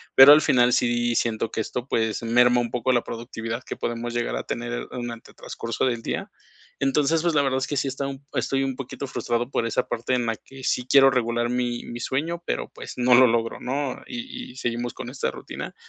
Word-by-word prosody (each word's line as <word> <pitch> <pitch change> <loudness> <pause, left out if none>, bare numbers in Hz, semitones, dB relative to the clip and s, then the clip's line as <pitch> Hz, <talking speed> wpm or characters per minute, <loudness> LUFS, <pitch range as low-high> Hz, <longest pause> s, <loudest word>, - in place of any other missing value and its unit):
pero 135 +2 +11
al 150 - +7
final 125 -3 +4
sí 120 -1 +2
siento 115 -1 0
que - - -3
esto, 125 +4 -4
pues, 110 +1 0
merma 125 +1 +4
un 120 - -4
poco 125 +1 +1
la 120 - +2
productividad 115 0 -5
que - - -5
podamos 120 0 -3
llegar 120 0 -1
a - - -3
tener - - -4
durante 120 -2 -7
el - - -26
transcurso 115 -1 -4
del 120 -3 0
día, - - -3 0.5
entonces, 150 +3 +2
pues, 170 -2 +1
la 145 - +4
verdad 130 -1 +1
es 130 - -2
que 145 - -2
sí 135 - 0
he - - 0
estado, 135 0 -3 0.2
estoy, 135 0 0
un 135 -1 -2
poquito 135 +1 -6
frustrado 120 0 -2
por 115 - 0
esa - - -1
parte 120 +2 -2
en 120 - 0
la 115 - 0
que 135 +3 -14
sí 125 0 0
quiero 135 0 +7
regular 120 -1 0
mi 125 -1 -1
mi 120 0 -7
sueño, 165 +7 -2
pero - - -2
pues, - - -8
no 125 0 +4
lo 130 0 +8
logro 115 0 0
¿no?, 135 +1 -2
y 250 - -7
y - - -20
seguimos 120 0 -2
con 125 -1 -7
esta 130 - -2
rutina, - - -8
125 Hz, 225 wpm, -24 LUFS, 120-135 Hz, 0.5 s, pero